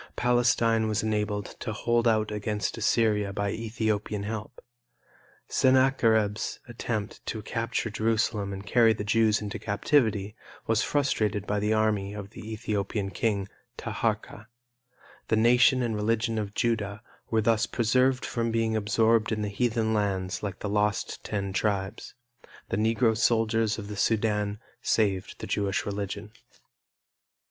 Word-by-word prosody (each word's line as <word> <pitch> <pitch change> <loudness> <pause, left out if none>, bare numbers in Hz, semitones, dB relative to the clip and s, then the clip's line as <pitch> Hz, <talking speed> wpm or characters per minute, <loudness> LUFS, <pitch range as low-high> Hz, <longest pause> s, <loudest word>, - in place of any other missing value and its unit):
Palestine 120 -2 +2
was 110 0 0
enabled 105 -1 -1
to 115 - -4
hold 120 +2 +1
out 110 -2 +2
against 105 0 -2
Assyria 110 -2 +1
by 100 0 -1
Ethiopian 110 -2 -2
help. 110 +1 -5 0.9
Sennacherib's 130 -6 +2
attempt 115 -3 -4
to 110 -2 -4
capture 115 0 -2
Jerusalem 110 -2 0
and 100 +1 -7
carry 115 +1 +4
the 105 - -5
Jews 110 0 +2
into 105 +1 -5
captivity, 105 -1 +1 0.3
was 115 0 +2
frustrated 110 -8 0
by 105 0 0
the 105 +1 +1
army 105 -2 +1
of 100 -1 -7
the 110 0 -9
Ethiopian 105 -2 -2
king, 100 +1 -1 0.3
Taharka. 110 -1 -3 0.8
The - - +2
nation 125 +3 +5
and 115 -2 -1
religion 110 +1 0
of 105 -1 -5
Judah 110 -2 -1 0.3
were 110 -1 +2
thus 115 0 +2
preserved 125 +3 +2
from 115 -1 -1
being 115 -1 0
absorbed 110 +1 +2
in 105 -1 -1
heathen 110 +1 0
lands 95 -4 -1
like 100 -2 -5
the - - -2
lost 105 -1 -1
Ten 100 -2 -3
Tribes. 95 0 -2 0.5
The - - -1
Negro 115 +1 +2
soldiers 115 -1 +2
of 105 -2 -6
the 105 - -6
Sudan 105 -1 0 0.2
saved 100 -4 0
the - - -6
Jewish 100 -2 -1
religion. 100 +1 -4
110 Hz, 135 wpm, -27 LUFS, 105-115 Hz, 0.9 s, nation